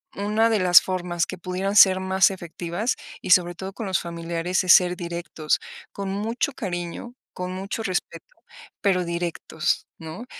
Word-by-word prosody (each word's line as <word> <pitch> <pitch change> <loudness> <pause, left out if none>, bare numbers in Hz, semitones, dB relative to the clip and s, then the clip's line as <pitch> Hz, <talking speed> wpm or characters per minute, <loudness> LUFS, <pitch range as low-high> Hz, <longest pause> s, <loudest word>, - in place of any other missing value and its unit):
una 210 +3 +1
de 225 - +2
las 180 -1 +7
formas 175 -2 -2
que 185 - -6
pudieran 185 +3 -3
ser 190 -2 +7
más 190 +1 +3
efectivas, 175 +4 -3 0.3
y 185 - -3
sobre 175 -1 +5
todo 190 +3 -7
con 225 - -6
los 185 - +1
familiares, 170 +2 -2
es 185 - +7
ser 180 -1 +5
directos, 170 -3 -2 0.3
con 200 -1 -5
mucho 225 +7 -2
cariño, 175 +2 -5 0.2
con 180 0 -5
mucho 195 +4 -4
respeto, 185 -4 -3 0.6
pero 185 -3 +2
directos, 170 -2 -2
¿no?, 160 +9 -8
185 Hz, 155 wpm, -24 LUFS, 175-195 Hz, 0.6 s, las